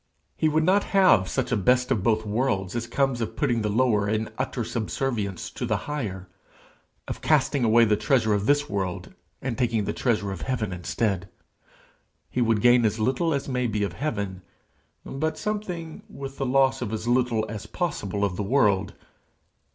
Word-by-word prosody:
He 155 - +2
would 155 +1 +2
not 190 +4 +3
have 180 - +5
such - - -2
a - - +3
'best 125 +5 +2
of 115 -7 +2
both 110 +1 +1
worlds' 105 -3 -1
as 120 0 -2
comes 135 0 0
of 115 - -3
putting 120 -6 +1
the 105 - -1
lower 105 -2 +2
in 110 +1 -1
utter 130 -2 -2
subservience 110 -3 -3
to - - -6
the - - +1
higher 105 -11 -4 0.8
of - - -5
casting 145 -3 +2
away 115 +1 +5
the 105 -1 +3
treasure 110 +1 +2
of 100 +1 0
this 145 0 +3
world 95 -6 -3 0.3
and 130 -2 -2
taking 115 -4 +1
the - - -2
treasure 105 -5 0
of 95 - -6
heaven 115 -7 -2
instead. 95 +1 -2 1.0
He 125 - 0
would 115 -3 +2
gain 120 +1 +5
as 110 0 +1
little 130 +9 +1
as 140 -2 -1
may 125 -2 0
be 105 -2 -1
of 100 - -2
heaven 100 -10 -3 0.6
but 155 +4 -2
something, 180 -6 -4
with 135 0 -8
the 135 - 0
loss 135 0 +3
of 115 -4 -3
as 110 +1 -4
little 120 -3 +2
as 105 -1 -7
possible 105 - -2
of 90 -2 -3
the - - -1
world. 105 -4 +2
115 Hz, 180 wpm, -25 LUFS, 105-135 Hz, 1.0 s, have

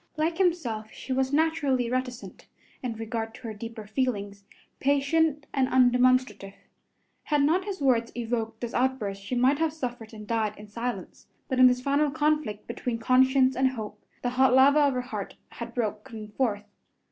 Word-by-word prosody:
Like 325 +3 0
himself 250 - 0
she 265 - -5
was 265 0 0
naturally 285 -5 +1
reticent 250 0 -4 0.3
in 250 -3 -3
regard 225 0 -4
to - - -14
her 225 -2 -5
deeper 225 +1 -8
feelings, 205 -4 -2 0.4
patient 285 +2 +1
and 265 -2 +2
undemonstrative. 250 -5 +2 0.7
Had 295 -2 +2
not 345 +6 +2
his 395 -4 -5
words 240 -4 +2
evoked 225 -2 -3
this 240 -1 -4
outburst 240 -6 -1
she 195 +6 -4
might 260 +4 +3
have 325 -1 +1
suffered 245 -7 -6
and 215 -2 -10
died 215 -1 -1
in 210 - -11
silence, 235 +4 -6 0.2
but 260 -2 -1
in 255 - +9
this 250 0 +2
final 285 +3 +2
conflict 300 -7 -1
between 235 0 -3
conscience 260 +2 +3
and 265 +1 +3
hope, 210 -3 -7 0.2
the 245 - 0
hot 255 0 +4
lava 280 +3 +6
of 285 -2 +3
her 250 - 0
heart 215 -6 -6
had 235 -1 -8
broken 215 -1 -4
forth. 210 -3 -1
250 Hz, 170 wpm, -27 LUFS, 225-275 Hz, 0.7 s, in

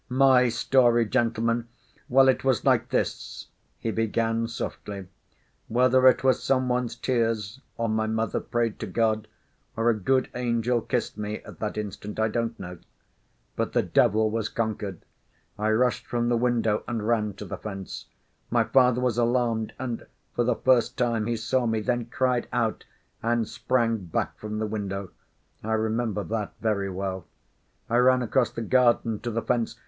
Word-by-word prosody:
"My 130 -1 +5
story, 120 0 +3
gentlemen? 115 0 0 0.4
Well, 135 +1 +6
it 130 - +3
was 130 -4 +1
like - - +3
this," - - -3 0.3
he 115 - -2
began 115 +1 0
softly. 105 -3 -6 0.6
"Whether 130 +2 +4
it 130 - +5
was 130 -1 +3
some 130 -1 +1
one's 125 -1 -1
tears, 115 -1 -1 0.2
or 115 - 0
my 110 0 0
mother 110 +1 -1
prayed 115 -2 -2
to 110 - -4
God, 110 +1 0 0.5
or 115 +1 +3
a - - +2
good 130 +5 +1
angel 120 -1 0
kissed 120 -1 -2
me 105 0 -4
at - - -12
that 105 -1 -3
instant, 105 0 -5
I 110 0 +2
don't 115 +1 -2
know. 90 -1 -8 0.8
But - - -2
the - - +3
devil 110 +1 +3
was 115 -1 -1
conquered. 105 -5 -3 0.5
I 105 +1 -1
rushed 120 +3 +1
from 120 0 0
the 120 - +3
window 115 -3 +1
and 115 -3 -3
ran 105 -3 +1
to - - -8
the - - -6
fence. 95 -3 -7 0.4
My - - +3
father 125 -2 +3
was 125 -2 +1
alarmed 120 -2 +1
and, 120 -3 -5 0.3
for 120 - +1
the 120 0 +1
first 125 -1 +2
time, 115 -3 0
he 120 -1 0
saw 120 +3 0
me 110 -1 +1
then, 120 +1 -1
cried 125 0 0
out, 115 -2 -1 0.4
and 115 -1 +1
sprang 115 -3 0
back 85 - -2
from 105 0 -5
the 110 - -1
window. 100 -3 -4 0.5
I 110 +1 -1
remember 110 -1 0
that 110 -1 -3
very 100 -3 0
well. 95 -1 -4 0.6
I 120 - +1
ran 125 0 +4
across 125 +2 +2
the 115 - -5
garden 120 -2 +3
to 120 - -4
the 115 0 -2
fence 120 -2 0
115 Hz, 170 wpm, -26 LUFS, 110-125 Hz, 0.8 s, Well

